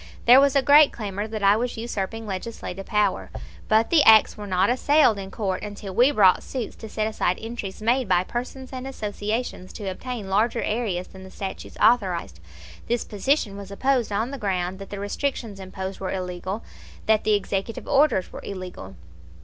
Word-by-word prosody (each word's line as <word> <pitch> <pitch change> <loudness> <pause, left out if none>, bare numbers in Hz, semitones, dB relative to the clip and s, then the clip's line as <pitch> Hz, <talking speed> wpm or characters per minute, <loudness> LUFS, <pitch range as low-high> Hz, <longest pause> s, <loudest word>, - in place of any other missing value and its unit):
There 250 +3 +8
was 280 -1 +3
a 275 - +4
great 290 +1 +7
clamor 205 -1 -4
that 215 -2 -5
I 200 +1 +6
was 240 +2 -2
usurping 225 -1 -4
legislative 195 -1 -6
power; 210 -3 0 0.4
but 220 +1 +3
the 330 -3 +6
acts 220 -4 +6
were 210 -1 -8
not 185 -1 +2
assailed 260 -4 +3
in 195 -1 -6
court 195 -2 -3
until 205 -2 -7
we 245 +7 +5
brought 200 -10 +4
suits 250 -4 -5
to 220 - -9
set 215 0 -1
aside 215 -4 0
entries 220 -3 -6
made 240 0 +1
by 180 -1 +3
persons 255 +5 -6
and 260 0 -5
associations 210 -4 -4
to 210 - -7
obtain 220 +2 -5
larger 220 +5 +1
areas 210 -6 -1
than 190 0 -12
the 190 - -11
statutes 190 0 -7
authorized. 185 - +2 0.5
This 240 0 0
position 215 0 0
was 200 -1 -8
opposed 250 +3 0
on 220 +5 -1
the 280 - -6
ground 190 -3 -2
that 195 - -9
the 200 - -6
restrictions 210 0 -3
imposed 190 0 -6
were 190 - -3
illegal; 185 +2 -4 0.4
that 220 -1 +3
the 215 -1 +3
executive 200 +2 -3
orders 275 - +2
were - - -7
illegal. 180 - -8
210 Hz, 180 wpm, -24 LUFS, 190-240 Hz, 0.5 s, There